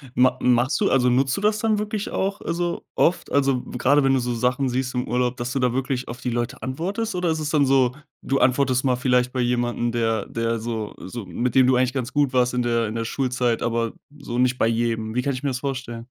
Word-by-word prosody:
ma 125 0 +4
machst 125 +3 +2
du - - +3
also 125 -2 +3
nutzt 135 +4 +2
du - - -3
das 210 +1 +2
dann 215 -2 +1
wirklich 210 0 -3
auch, 195 +1 -2
also 170 0 -2
oft? 170 - +1
Also, 135 -3 +2
gerade 135 +4 +2
wenn 135 - +3
du 135 - +3
so 120 0 -2
Sachen 125 +3 0
siehst 125 +1 -2
im 125 0 -2
Urlaub, 125 0 0
dass 120 +1 -3
du 135 - 0
da 125 -1 +2
wirklich 130 0 -2
auf 120 - -7
die 125 - -3
Leute 120 +3 -3
antwortest? 185 - -3
Oder 180 -2 0
ist 160 - 0
es 150 -1 -2
dann 150 -2 +3
so: 130 -2 +3 0.3
Du 135 0 0
antwortest 130 -1 +2
mal 130 -2 +2
vielleicht 125 -1 +2
bei 130 - -3
jemandem, 120 -1 0
der 115 -3 0
der 115 0 -2
so 110 -2 -4
so 110 +3 -7
mit 115 +7 -2
dem 130 -1 +6
du 130 -1 +4
eigentlich 130 +1 +1
ganz 130 -1 -3
gut 145 -3 +1
warst 125 -1 +2
in 125 - 0
der 115 -2 +1
in 110 - -5
der 115 - -2
Schulzeit, 125 -1 -1
aber 115 -1 -1 0.3
so 120 -4 -5
nicht 125 0 +2
bei 115 - +2
jedem. 115 -1 -1
Wie 125 - +2
kann 140 +2 -1
ich 125 +2 -6
mir 140 - 0
das 125 - -3
vorstellen? 130 -4 -4
125 Hz, 250 wpm, -23 LUFS, 120-135 Hz, 0.3 s, dem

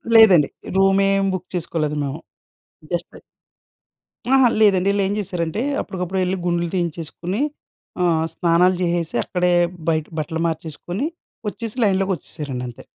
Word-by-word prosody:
లేదండి. 195 -10 +7 0.3
రూమ్ 195 0 +4
ఏం 195 0 +2
బుక్ 185 -1 -4
చేసుకోలేదు 160 -3 -1
మేము. 140 +2 -4 0.7
జస్ట్ - - -3 1.2
అహా! 265 -2 +6
లేదండి. 195 -2 +4
వీళ్ళు 200 0 +1
ఏం 200 - -1
చేశారంటే, 180 0 -2 0.2
అప్పటికప్పుడు 185 0 -3
వెళ్లి 185 +1 0
గుండ్లు 170 0 +1
తీయించేసుకొని 175 - -3 0.6
ఆహ్, 165 -2 +2
స్నానాలు 180 +1 +3
చేసేసి, 170 -2 -1
అక్కడే 180 -1 +1 0.4
బయట 155 -2 +1
బట్టలు 160 +2 -3
మార్చేసుకొని, 165 - -4 0.4
వచ్చేసి 225 +2 -5
లైన్‌లోకి 195 -1 +2
వచ్చేసారండి 145 -5 -6
అంతే. 120 - -10
180 Hz, 125 wpm, -21 LUFS, 160-195 Hz, 1.2 s, లేదండి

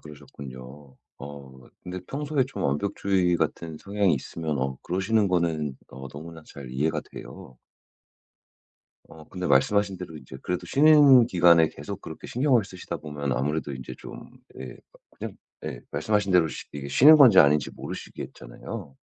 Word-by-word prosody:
그러셨군요. 70 -2 -12 0.2
어 70 -2 -11
근데 90 +1 -6
평소에 145 -1 -1
좀 135 - -6
완벽주의 90 +4 0
같은 80 0 -3
성향이 100 -4 +1
있으면 75 +2 -4
어 65 0 -2
그러시는 100 +3 +1
거는 80 -6 -1
어 65 +1 -9
너무나 80 +3 -10
잘 70 -3 -10
이해가 75 +4 -1
돼요. 65 +1 -11 1.5
어 80 -1 -14
근데 90 -1 -5
말씀하신 100 +8 +2
대로 85 -3 -8
이제 65 -2 -11
그래도 90 - -3
쉬는 145 -4 +6
기간에 85 -4 +5
계속 95 +9 -8
그렇게 80 - -9
신경을 125 -3 +2
쓰시다 90 -3 -7
보면 75 -3 -4
아무래도 75 +3 -2
인제 65 -1 -8
좀 - - -11 0.3
예 65 - -7
뭐 - - -23 0.2
그냥 - - -6 0.3
예 - - -6
말씀하신 100 +6 0
대로 85 -3 +4
쉬 - - -7
이게 70 -1 -6
쉬는 150 - +8
건지 125 -10 +7
아닌지 70 -1 +5
모르시겠잖아요. 65 +3 -9
80 Hz, 340 characters per minute, -25 LUFS, 70-95 Hz, 1.5 s, 쉬는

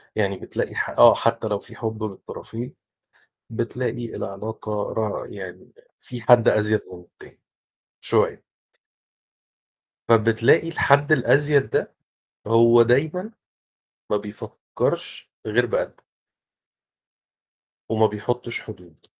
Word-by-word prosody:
يعني 100 -3 0
بتلاقي - - -5
ح - - -1
آه، - - +7
حتى 115 -1 0
لو 105 -1 -1
في - - -16
حُب 110 -1 -5
من 110 - -1
الطرفين، 115 +5 -9 0.8
بتلاقي 120 +1 -4
العلاقة 105 +1 -5
را 110 -2 -2
يعني 95 -2 -10 0.3
في 120 -2 -9
حد 120 0 +5
أزّيد 105 0 +2
من 90 - -10
التاني 90 - -19 0.6
شوية. - - +1 1.7
فبتلاقي 115 +8 +4
الحَد 145 -2 +3
الأزيد 145 +1 +3
ده - - -1 0.5
هو 115 +1 +6
دايمًا 155 - +1 0.8
ما 105 - +2
بيفكّرش 105 0 -5 0.2
غير 120 +3 +2
بقلبه. - - -3 1.8
وما 110 -1 +3
بيحطش 120 +3 -4
حدود، 90 -8 -14
115 Hz, 105 wpm, -23 LUFS, 105-125 Hz, 1.8 s, آه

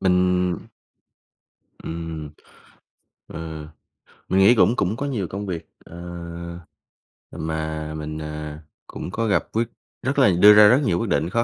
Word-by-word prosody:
Mình 90 -1 +2 1.3
ừm, 80 -2 -5 1.0
ờ, 80 -2 -7 0.6
mình 95 - +3
nghĩ 100 +5 +7
cũng 120 +1 +4
cũng 100 +5 0
có 140 - -3
nhiều 115 -9 -2
công 100 +1 -5
việc, 85 -3 -5 0.2
ờ, 85 - -12 1.4
ừm, 80 - -5
mà 80 -1 -3
mình, 75 0 -5
à, 75 0 -6 0.2
cũng - - -7
có 115 +3 -1
gặp 100 - +2
quyết 115 +1 0 0.3
rất 130 +3 0
là 130 - +6
đưa 105 +2 +9
ra 105 0 +8
rất 125 +7 +5
nhiều 85 -4 +1
quyết 115 - -2
định 80 +1 +1
khó 115 +5 +1
90 Hz, 150 wpm, -23 LUFS, 80-105 Hz, 1.4 s, đưa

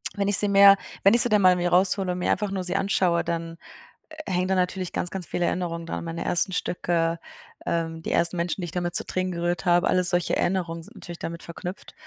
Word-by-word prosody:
wenn 200 -1 -1
ich 205 -2 +2
sie 205 - +1
mir 200 0 +7 0.3
wenn 195 - +6
ich 240 - +5
sie 245 - +1
dann 210 -2 +3
mal 185 -1 +6
mir 175 0 0
raushole 185 +1 +2
und 180 - -5
mir - - 0
einfach 210 -1 0
nur 190 -1 -3
sie 180 +1 -2
anschaue, 185 -3 +1
dann 165 0 -4 0.7
hängen 185 0 0
da 190 - +1
natürlich 185 0 -1
ganz, 175 - -2
ganz 190 -1 -5
viele 175 - -1
Erinnerungen 170 -2 -2
daran. 165 - -5
Meine 165 0 -4
ersten 175 +2 +1
Stücke, 170 -2 -1 0.5
ähm, 165 -1 -2
die - - -4
ersten 170 +1 +2
Menschen, 175 +2 -2
die - - -3
ich 170 - -7
damit 175 0 -3
zu - - 0
Tränen 185 0 -2
gerührt 175 -1 -2
habe, 175 0 +3
alles 180 -1 +2
solche 175 -1 +1
Erinnerungen 170 -3 -1
sind 210 +7 -14
natürlich 175 -3 -9
damit 170 0 -6
verknüpft. 175 +3 -8
180 Hz, 235 wpm, -25 LUFS, 170-190 Hz, 0.7 s, mir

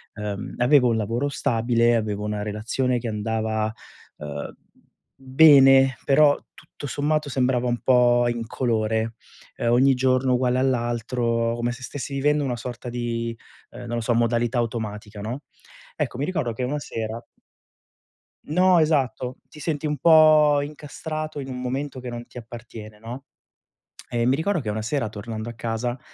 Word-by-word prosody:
Uhm, 105 -1 -5
avevo 125 0 +4
un 115 - +1
lavoro 115 +6 -1
stabile, 120 -2 +2
avevo 105 -2 -2
una 105 0 -2
relazione 115 +5 -1
che 120 - -5
andava, 110 0 -1 0.5
uhm, 75 -1 -6 0.6
bene, 135 -1 +6
però 145 +1 +5 0.2
tutto 145 - -10
sommato 150 +2 -1
sembrava 125 -2 +1
un 120 -1 0
po' 120 -1 +4
incolore, 115 -1 -1 0.4
uhm, 120 - 0
ogni 130 +3 +5
giorno 130 0 +2
uguale 125 0 +1
all'altro, 120 -2 0
come 120 0 -1
se 125 +2 -9
stessi 140 +1 -6
vivendo 150 +2 +2
una 125 -3 -2
sorta 120 +1 -6
di, 115 -1 -3 0.4
uhm, 120 - -10
non 120 0 -4
lo - - -1
so, 120 +2 +1
modalità 120 +1 +1
automatica, 110 -3 -4
no. 120 +7 -5 0.5
Ecco, - - -3
mi 140 - -1
ricordo 155 -9 -1
che 125 - -4
una 145 +4 -1
sera 115 -3 -5 1.2
No, 180 +3 +4
esatto, 135 -5 0
ti 155 - -14
senti 150 -1 -3
un 150 -1 -1
po' 155 -1 +6
incastrato 155 +1 -6
in 135 - -7
un 125 -1 -5
momento 130 +2 -3
che 125 0 -6
non 120 0 -6
ti - - -14
appartiene, 115 -2 -10
no. 120 +5 -9 0.9
E 120 -1 0
mi 130 +2 +3
ricordo 170 +4 0
che 115 - -6
una 105 +1 -2
sera 115 +1 -1
tornando 110 +1 -6
a 120 - -7
casa, 115 +2 -3
120 Hz, 155 wpm, -24 LUFS, 115-135 Hz, 1.2 s, bene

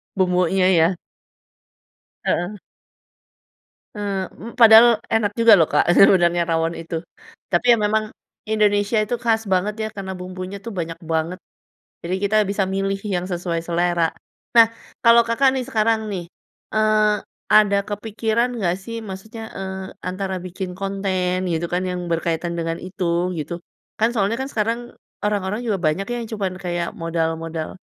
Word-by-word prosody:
Bumbunya 185 0 +2
ya. 170 +1 +3 1.3
Heeh. 175 +4 -1 1.4
Eee, 200 -2 -2
m 230 - -9
padahal 230 0 +8
enak 225 -2 +1
juga 230 -1 +7
loh 165 -5 +4
Kak, 145 - +3
sebenarnya 175 -3 +5
rawon 165 0 0
itu. 165 0 -4 0.5
Tapi 175 +6 +1
ya - - -5
memang, 215 +1 0 0.4
Indonesia 210 0 +2
itu 230 +3 -2
khas 225 -2 +1
banget 190 +3 +1
ya - - -1
karena 190 -1 -5
bumbunya 185 +1 -7
tuh 230 - -6
banyak 165 -1 -3 0.2
banget. 160 +2 0 0.7
Jadi 175 +2 -2
kita 205 +2 0
bisa 200 -1 0
milih 195 +1 -1
yang 180 -3 -1
sesuai 175 -2 -2
selera. 170 0 +1 0.5
Nah 230 - +10 0.4
kalau 230 0 +8
Kakak 235 +3 +2
nih 265 - -1
sekarang 220 -2 +1
nih, 185 -4 -4 0.5
eee, 215 -1 +3 0.3
ada 205 -2 +6
kepikiran 220 +3 -1
nggak 180 -5 0
sih? 230 +3 -7
Maksudnya, 215 +4 -8 0.2
eee, 190 0 -5 0.3
antara 190 +1 -3
bikin 185 +1 -6
konten 190 -1 -1 0.2
gitu 165 +1 -1
kan 180 - +1
yang 180 -1 -3
berkaitan 170 +1 -1
dengan 165 0 -2
itu 185 0 -5 0.3
gitu. 155 +3 -4 0.5
Kan 225 +1 +3
soalnya 215 0 0
kan 265 - -4
sekarang, 230 -1 -1 0.4
orang-orang 210 +1 -1
juga 215 -4 0
banyak 170 +2 0
yang 240 -1 -3
cuma 205 -3 -1
kayak 175 -2 -3
modal 165 -1 0
modal, 165 -1 -5
195 Hz, 145 wpm, -21 LUFS, 175-215 Hz, 1.4 s, Nah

